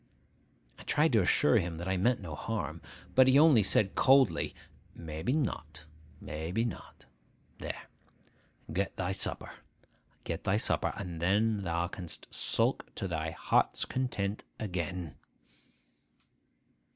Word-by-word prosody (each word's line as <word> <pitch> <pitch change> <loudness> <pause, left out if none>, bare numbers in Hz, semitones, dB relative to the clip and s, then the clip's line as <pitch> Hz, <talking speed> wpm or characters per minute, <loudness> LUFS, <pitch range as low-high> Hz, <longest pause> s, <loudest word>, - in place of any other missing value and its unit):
I - - -10
tried - - +2
to - - +5
assure - - +4
him 85 -1 -3
that 85 +2 -5
I 95 - +1
meant 120 +6 +2
no 85 -5 -6
harm; 75 - -4 0.3
but 130 0 +6
he 130 +1 +6
only 150 -6 +7
said 100 0 +3
coldly, 135 -2 +4 0.4
'Maybe 80 +6 -4
not, 80 - -2 0.3
maybe 85 +9 -3
not! 115 - -7 0.5
There, - - -5 0.9
get 100 +1 -2
thy 95 0 -1
supper, 95 - -1 0.7
get - - -4
thy - - +2
supper; - - +1
and 90 -5 -6
then 105 +4 +2
thou 85 -2 -1
canst 90 -3 -8
sulk - - 0
to 95 - -3
thy 80 -2 -2
heart's 80 - +1
content 110 -6 -2 0.2
again. 90 -4 -4
95 Hz, 125 wpm, -31 LUFS, 85-115 Hz, 0.9 s, only